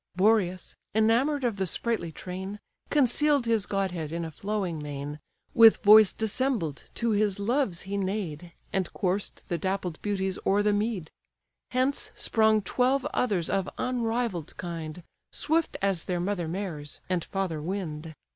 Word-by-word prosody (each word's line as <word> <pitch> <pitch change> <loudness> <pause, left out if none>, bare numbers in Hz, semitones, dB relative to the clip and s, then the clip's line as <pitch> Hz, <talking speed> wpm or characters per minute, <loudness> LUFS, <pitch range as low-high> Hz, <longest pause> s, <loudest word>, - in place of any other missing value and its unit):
Boreas, 185 -2 +2 0.2
enamour'd 245 +7 +3
of 235 -4 0
the 190 -1 0
sprightly 220 -3 -1
train, 190 +5 -6 0.3
Conceal'd 290 0 +3
his 225 -3 +1
godhead 180 -6 -2
in 170 0 -3
a 160 - -6
flowing 190 -2 -3
mane, 145 0 -5 0.3
With 225 -2 +7
voice 215 -1 +8
dissembled 220 - -1
to 230 -1 0
his 205 -2 +1
loves 215 -3 0
he 195 +1 -3
neigh'd, 185 -4 -3 0.2
And 185 -3 0
coursed 190 +2 -2
the 170 -2 -2
dappled 190 -4 -2
beauties 190 -2 -1
o'er 200 +1 +3
the 210 0 +3
mead: 205 -5 -1 0.6
Hence 255 +2 0
sprung 220 -2 +3
twelve 255 +6 +1
others 200 -9 +1
of 195 -1 0
unrivall'd 230 -8 -1
kind, 170 -1 -6 0.3
Swift 320 +1 0
as 195 -4 +1
their 180 -1 -1
mother 180 -2 -1
mares, 165 -5 -4
and 180 -3 0
father 185 -6 -2
wind. 160 -3 -4
195 Hz, 145 wpm, -28 LUFS, 175-225 Hz, 0.6 s, voice